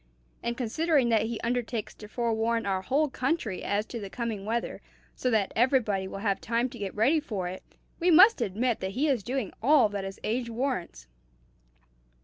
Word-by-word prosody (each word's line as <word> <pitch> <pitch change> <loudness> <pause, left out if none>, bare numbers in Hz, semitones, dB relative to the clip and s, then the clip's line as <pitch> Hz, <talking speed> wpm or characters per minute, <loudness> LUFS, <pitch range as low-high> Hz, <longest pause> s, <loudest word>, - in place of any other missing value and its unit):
And 235 0 -3
considering 275 +2 +1
that 220 -1 +2
he 230 -1 -4
undertakes 235 -2 -2
to 210 - -11
forewarn 230 0 0
our 190 -1 0
whole 280 +9 +1
country 260 - -2
as 205 +1 0
to 235 - -6
the 200 -2 -6
coming 225 -3 -4
weather, 230 +2 -2 0.3
so 255 - -1
that 215 -5 +1
everybody 225 -6 +2
will 195 - -7
have 200 -2 +1
time 235 +2 0
to 240 - -11
get 200 -2 -4
ready 260 +10 +3
for 205 - -4
it, 185 +1 -6 0.4
we 355 +1 +2
must 370 - +7
admit 230 +3 0
that 190 +1 -4
he 295 +4 +2
is 265 -6 +1
doing 245 -1 -3
all 265 -2 +5
that 200 -1 -4
his 195 0 -7
age 235 +2 -1
warrants." 230 - -3
230 Hz, 185 wpm, -28 LUFS, 205-255 Hz, 0.4 s, must